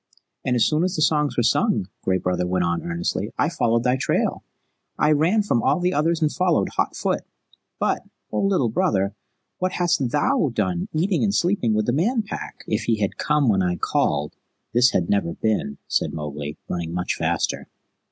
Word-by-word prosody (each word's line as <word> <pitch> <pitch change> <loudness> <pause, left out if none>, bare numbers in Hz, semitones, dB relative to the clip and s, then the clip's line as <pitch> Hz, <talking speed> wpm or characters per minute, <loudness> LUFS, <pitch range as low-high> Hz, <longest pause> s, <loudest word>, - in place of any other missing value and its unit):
"And 125 - +1
as 120 - +4
soon 155 +2 +2
as 185 +1 0
the 155 - -1
songs 150 -2 +1
were 120 - +3
sung," 195 - +2
Gray 95 0 +1
Brother 90 0 -1
went 90 -1 +1
on 85 0 0
earnestly, 85 0 -2
"I - - +2
followed 115 0 +1
thy 125 +1 +2
trail. - - 0 0.5
I 150 - +3
ran 170 +9 +3
from 120 - +1
all - - +2
the 180 +1 +1
others 165 +1 +1
and 150 - +2
followed 180 -1 +1
hot - - -1
foot. - - -1 0.6
But, - - 0 0.3
O - - 0
Little 190 -12 +2
Brother, 100 -2 +1 0.5
what 185 0 -1
hast 170 -8 +1
THOU 155 - +1
done, 95 -5 -1
eating 175 +3 +1
and 200 -2 +1
sleeping 170 - +1
with 110 0 +1
the 120 - +1
Man 220 - +1
Pack?" 205 - -7
"If 110 +1 -2
ye 115 - +3
had 100 -2 -2
come 150 -2 +1
when 100 -4 +3
I 90 -1 +1
called, 75 -3 0 0.4
this 120 +1 +5
had 85 -7 0
never 100 -5 0
been," 105 -10 -1
said - - 0
Mowgli, 75 -1 -5
running 85 -1 -3
much 90 0 -1
faster. - - -1
120 Hz, 190 wpm, -23 LUFS, -, 0.6 s, this